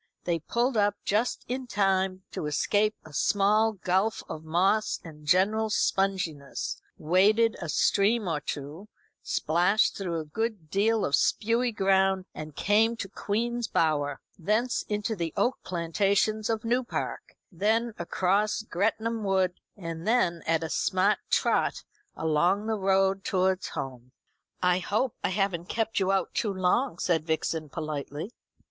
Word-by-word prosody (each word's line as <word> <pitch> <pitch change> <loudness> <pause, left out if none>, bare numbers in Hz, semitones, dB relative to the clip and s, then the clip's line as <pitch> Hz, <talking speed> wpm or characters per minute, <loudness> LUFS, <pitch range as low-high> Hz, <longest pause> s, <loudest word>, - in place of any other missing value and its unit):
They 170 -1 0
pulled 240 - 0
up 205 -1 +3
just 215 +5 0
in 255 +1 -4
time 190 -3 +1
to 150 - -4
escape 205 +8 +1
a 155 - -13
small 210 +7 +3
gulf 190 +2 0
of 155 - -7
moss 190 +7 +1
and 150 -3 -12
general 210 +6 +3
sponginess, 185 -9 -1 0.2
waded 205 +7 +3
a - - -4
stream 210 +1 +2
or 160 -3 0
two, 150 +9 -6 0.3
splashed 175 +7 +2
through 175 -4 -3
a 155 - -5
good 205 -1 -4
deal 215 +2 +2
of 140 - -3
spewy 230 +7 +1
ground, 190 -2 +2
and 155 -1 -8
came 220 +3 +3
to 200 - -4
Queen's 235 +4 -2
Bower; 145 -3 0 0.2
thence 215 +8 +1
into 210 +1 -1
the 170 -4 -4
oak 255 - +1
plantations 200 +5 0
of 225 0 -1
New 245 +3 +1
Park; 240 - -5
then 220 +6 +1
across 195 +5 0
Gretnam 220 +3 -1
Wood; 190 -2 +1 0.2
and 165 -1 -6
then 180 -8 +2
at 165 0 +2
a 160 - -3
smart 190 +3 +2
trot - - +1 0.3
along 175 +6 +1
the 225 - 0
road 195 0 +2
towards 190 0 +1
home. 125 -1 -7 0.5
"I 180 0 +3
hope 215 +6 -1
I - - +1
haven't 190 -3 -1
kept 225 -1 0
you 190 0 +1
out 195 - 0
too 210 - 0
long?" 190 +8 +1
said 165 -4 +1
Vixen 160 -1 -1
politely. 150 +5 -5
195 Hz, 145 wpm, -27 LUFS, 170-215 Hz, 0.5 s, up